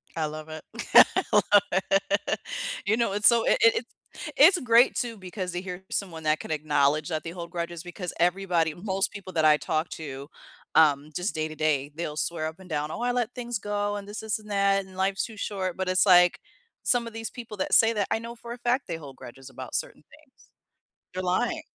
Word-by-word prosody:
I 160 -2 -1
love 155 +1 -7
it. 155 0 -8 0.3
I - - +7
love - - +5 0.3
it. 195 +2 0 0.5
You 220 +3 +2
know, 230 -4 0
it's 205 +1 +4
so 235 -1 +4
it - - +3
it 230 +1 +4 0.5
It's 365 -3 +7
great 240 0 +4
too 235 -3 -2
because 185 -1 -5
to 175 +1 -4
hear 185 0 -7
someone 165 -5 -4
that 155 0 +1
could - - -7
acknowledge 150 0 +1
that 155 -2 -3
they 165 - -6
hold 170 -1 -8
grudges 170 -1 -5
because 180 0 -6
everybody, 175 -3 +1
most 190 +2 -2
people 195 -3 -9
that 160 -2 +2
I 150 -1 +6
talk 155 +2 -2
to, 140 -3 -7 0.5
um, 150 -2 +4
just 180 +4 -2
day 155 0 -1
to 155 - -9
day, 150 -2 0
they'll 155 -2 -4
swear 155 -1 -1
up 160 +4 -8
and 185 - -14
down 150 -1 -2
"Oh, - - -5
I 245 0 +1
let 245 -1 -1
things 240 -3 -4
go 205 0 -2
and 200 -1 -7
this, 205 +1 -6
this, 220 0 -2
and 210 0 -15
that, 195 -1 +2
and 190 - -15
life's 195 0 0
too 220 -3 -11
short," 190 -4 -3
but 190 -1 -2
it's 185 +1 +3
like 180 -2 +6 0.4
some 240 -2 +1
of 230 - -9
these 225 0 -5
people 230 -3 -9
that 190 - -2
say 225 0 +6
that 205 -3 -1
I 220 - +1
know 235 +1 -8
for 235 0 -8
a - - -9
fact 245 +1 0
they 165 -2 -3
hold 140 -4 -11
grudges 130 +2 -12
about - - -8
certain - - -4
things. - - -22 0.7
They're 185 - -3
lying. 180 0 0
185 Hz, 225 wpm, -26 LUFS, 160-210 Hz, 0.7 s, I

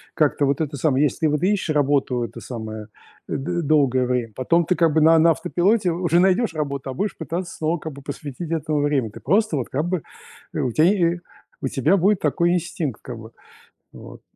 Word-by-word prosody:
как-то, 145 -1 +2
вот 140 +2 0
это 150 -2 -3
самое, 140 +1 +2
если 155 +2 +1
вот 150 +2 0
ищешь 185 -5 +1
работу, 135 -4 +1
это - - -7
самое, 110 -3 -7 0.4
д 175 +5 -2
долгое 140 -5 +2
время, 125 -3 -1
потом 165 +6 +2
ты, 180 - +1
как 165 -3 +2
бы, 160 - +3
на 160 +1 +6
на 170 - +5
автопилоте 180 +5 +1
уже 170 0 +1
найдешь 190 0 +2
работу, 140 -3 -3
а - - -4
будешь 205 +6 -2
пытаться 170 +3 -5
снова, 160 +2 -1
как 160 -1 -7
бы, 140 - -11
посвятить 145 +3 -7
этому 155 -2 -1
время. 140 -7 0
Ты - - -11
просто, 195 - +1
вот, 125 - -3
как 150 +5 -1
бы, 180 -4 -1 0.5
э, - - -3
у 125 - 0
тя, 155 - +2
е 175 -3 +2 0.4
у 135 - -1
тебя 150 +9 +2
будет 195 +2 +3
такой 170 +3 +1
инстинкт, 160 -8 -3
как 120 -3 -7
бы, 110 +1 -11 0.6
вот. - - -12
155 Hz, 205 wpm, -22 LUFS, 135-175 Hz, 0.6 s, на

